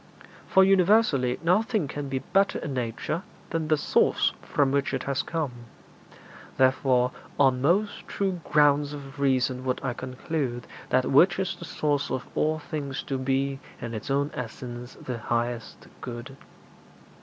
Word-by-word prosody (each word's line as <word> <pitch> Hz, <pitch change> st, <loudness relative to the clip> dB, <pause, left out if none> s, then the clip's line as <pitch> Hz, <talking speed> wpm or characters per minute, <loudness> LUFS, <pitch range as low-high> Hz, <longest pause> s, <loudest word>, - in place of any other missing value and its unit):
For 190 Hz, -, +6 dB
universally 190 Hz, -, +4 dB
nothing 205 Hz, -, +2 dB
can 145 Hz, 0 st, -5 dB
be 135 Hz, -, -1 dB, 0.2 s
better 195 Hz, +1 st, +3 dB
in 145 Hz, -, -4 dB
nature 125 Hz, +6 st, -2 dB, 0.3 s
than 165 Hz, -2 st, -1 dB
the 155 Hz, 0 st, +3 dB
source 150 Hz, -, +2 dB
from 140 Hz, -2 st, +1 dB
which 140 Hz, 0 st, +1 dB
it -, -, -3 dB
has 140 Hz, -1 st, 0 dB
come; 160 Hz, -5 st, -2 dB, 1.1 s
therefore 130 Hz, -1 st, +3 dB, 0.3 s
on 130 Hz, -2 st, +4 dB
most 195 Hz, +9 st, +1 dB
true 190 Hz, -3 st, -2 dB
grounds 145 Hz, -1 st, +3 dB
of 140 Hz, -1 st, -9 dB
reason 130 Hz, -2 st, +1 dB
would 130 Hz, -1 st, -1 dB
I 130 Hz, -2 st, -1 dB
conclude 130 Hz, 0 st, -3 dB, 0.2 s
that 130 Hz, 0 st, +3 dB
which 175 Hz, +7 st, +6 dB
is 190 Hz, -1 st, -1 dB
the -, -, -9 dB
source 145 Hz, -2 st, -1 dB
of 130 Hz, -1 st, -3 dB
all 155 Hz, +1 st, +1 dB
things 145 Hz, -2 st, -4 dB
to 135 Hz, -2 st, -3 dB
be 135 Hz, +1 st, 0 dB, 0.2 s
in 115 Hz, -1 st, -5 dB
its 110 Hz, +4 st, -6 dB
own 140 Hz, +2 st, +1 dB
essence 120 Hz, +1 st, -7 dB
the 125 Hz, -2 st, -6 dB
highest 120 Hz, 0 st, -3 dB, 0.2 s
good.' 125 Hz, +2 st, -7 dB
140 Hz, 150 wpm, -27 LUFS, 125-155 Hz, 1.1 s, For